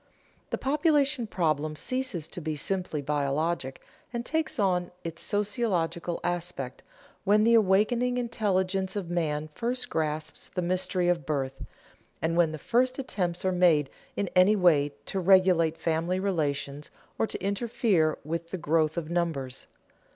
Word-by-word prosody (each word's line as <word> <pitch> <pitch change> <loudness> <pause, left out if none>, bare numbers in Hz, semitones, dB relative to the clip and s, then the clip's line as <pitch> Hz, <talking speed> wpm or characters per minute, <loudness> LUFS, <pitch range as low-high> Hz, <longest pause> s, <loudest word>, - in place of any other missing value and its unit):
_ - - -39
The - - -1
population 285 -3 +2
problem 155 -5 0
ceases 250 - -2
to 175 - -6
be 155 -1 -2
simply 170 -1 -2
biologic, 145 0 -1 0.3
and 235 -1 -3
takes 320 0 -1
on 180 -4 +1
its 165 0 -6
sociological 200 -5 -1
aspect, 175 -7 -3 0.4
when 210 +2 +4
the 230 +1 +5
awakening 230 +4 +3
intelligence 195 -5 0
of 185 -4 -3
man 155 -3 -1
first 240 +10 -3
grasps 155 -1 -2
the 180 - -3
mystery 180 0 0
of 170 -5 +1
birth, 135 -3 -2 0.6
and 165 +1 0
when 170 -2 +4
the 155 - -5
first 250 - +1
attempts 185 -10 -2
are 185 - +3
made 170 -6 +3 0.3
in 200 - 0
any 185 +4 +6
way 150 -7 +3
to 195 - -2
regulate 180 -3 +4
family 165 +3 0
relations 150 -6 -2 0.3
or 225 - +2
to - - -5
interfere 200 -5 +1
with 165 +2 -4
the 185 - -3
growth 160 -1 +1
of 165 -1 -3
numbers. 160 -7 -2
175 Hz, 145 wpm, -28 LUFS, 155-205 Hz, 0.6 s, any